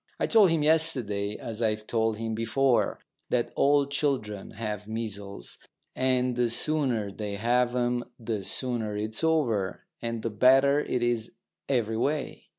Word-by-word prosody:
I - - +2
told 215 -5 +5
him 165 -2 +1
yesterday, 130 -11 +1
as 115 0 -6
I've 110 -1 0
told 110 -1 0
him 115 0 -3
before, 120 +3 +1 0.3
that 120 -1 0
all 145 0 +4
children 135 -8 -2
have 105 -2 -5
measles, 100 - -5 0.4
and 130 -1 +1
the 120 -1 +1
sooner 120 -5 0
they 105 0 -5
have 120 +3 +1
'em 120 0 0
the 110 -3 -3
sooner 115 -1 -2
it's 110 +5 -3
over, 120 -12 +1 0.2
and 115 -1 -3
the 115 - -2
better 135 +6 +5
it 125 -4 -1
is 120 -2 -1 0.4
every 115 -4 +1
way. 145 +4 -2
120 Hz, 150 wpm, -27 LUFS, 110-135 Hz, 0.4 s, told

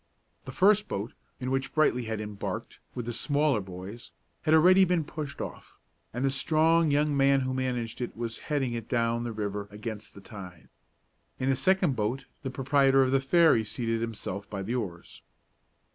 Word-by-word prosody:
The 130 - -6
first 210 +7 +4
boat, 100 +4 -4 0.3
in 130 0 -3
which 135 0 -2
Brightly 125 -6 +2
had 110 -1 -3
embarked, 105 -1 -5 0.2
with 120 - -4
the 120 - -3
smaller 145 -1 +1
boys, 95 +5 -9 0.3
had 155 - +2
already 185 +4 +7
been 180 -3 +2
pushed 150 -2 -6
off, - - -8 0.3
and 125 +3 -2
the 135 - +2
strong 160 +3 +3
young 145 0 +2
man 135 0 +4
who 130 0 -2
managed 125 -3 -2
it 120 - -4
was 115 -1 -4
heading 135 -5 0
it 115 -1 -5
down 115 -1 +1
the 120 - -3
river 105 -2 -4
against 105 +1 -7
the - - -10
tide. 95 -6 -11 0.7
In 130 +1 +1
the - - +2
second 180 +1 +2
boat 120 +4 -2 0.2
the 135 - -4
proprietor 135 0 +3
of 130 - 0
the 135 - +4
ferry 155 -4 +4
seated 115 +1 -2
himself 100 -3 -5
at 95 -1 -4
the 115 - -2
oars. 90 -9 -5
125 Hz, 180 wpm, -28 LUFS, 110-145 Hz, 0.7 s, already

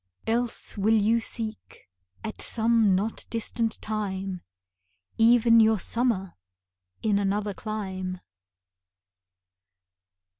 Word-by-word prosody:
Else 230 -2 -1
will 220 +2 +4
you 225 +3 +3
seek, 220 - -7 0.4
at 220 - -2
some 225 -3 +3
not 210 +4 -2
distant 230 0 -2
time, 195 -4 -3 0.8
Even 230 0 +6
your 220 0 +5
summer 220 -5 -1 0.7
in 205 -2 +2
another 205 +1 -1
clime. 190 -3 -5
215 Hz, 85 wpm, -26 LUFS, 195-230 Hz, 0.8 s, Even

